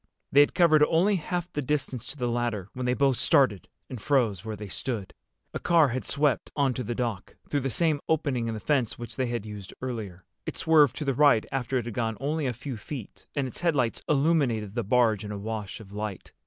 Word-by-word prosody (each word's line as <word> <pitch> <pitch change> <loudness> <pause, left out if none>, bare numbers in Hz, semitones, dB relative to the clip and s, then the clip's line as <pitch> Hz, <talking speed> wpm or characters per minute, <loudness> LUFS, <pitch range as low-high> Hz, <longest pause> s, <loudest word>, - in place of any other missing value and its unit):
They 140 - +6
had 145 - +5
covered 155 -4 +5
only 190 +6 +3
half 175 +1 -4
the 145 - -1
distance 130 -3 -2
to 145 - -7
the 125 -2 -1
ladder 120 -5 -2
when 125 -1 -3
they 125 - +2
both 135 -2 +2
started 130 - +3 0.2
and 125 -4 -7
froze 115 - +1
where 110 -1 -4
they 105 0 -7
stood. 105 -1 -4 0.4
A - - -3
car 165 -4 +4
had 130 +1 -3
swept 145 -3 0
onto 135 -3 +1
the 120 0 -3
dock, 115 -6 -3
through 145 - 0
the 135 0 -2
same 150 +4 +1
opening 140 -7 +1
in 115 - -2
the - - -5
fence 130 -1 +1
which 120 -2 -8
they 130 +1 0
had 120 -3 -3
used 105 -2 -9
earlier. 105 -9 -5 0.2
It - - -4
swerved 150 -6 +4
to 150 - -4
the 135 - +1
right 140 -4 +4
after 135 -1 -1
it 120 - -2
had 120 - -5
gone 115 -2 -1
only 145 +2 -1
a 125 - -1
few 120 +2 -6
feet, 115 +1 -9
and 140 -2 0
its 130 - -6
headlights 145 -9 +1
illuminated 135 -9 +2
the 120 0 -1
barge 110 -1 +2
in 105 - -6
a 105 - -4
wash 105 0 -5
of 100 -3 -13
light. 105 -2 -6
125 Hz, 225 wpm, -27 LUFS, 110-145 Hz, 0.4 s, They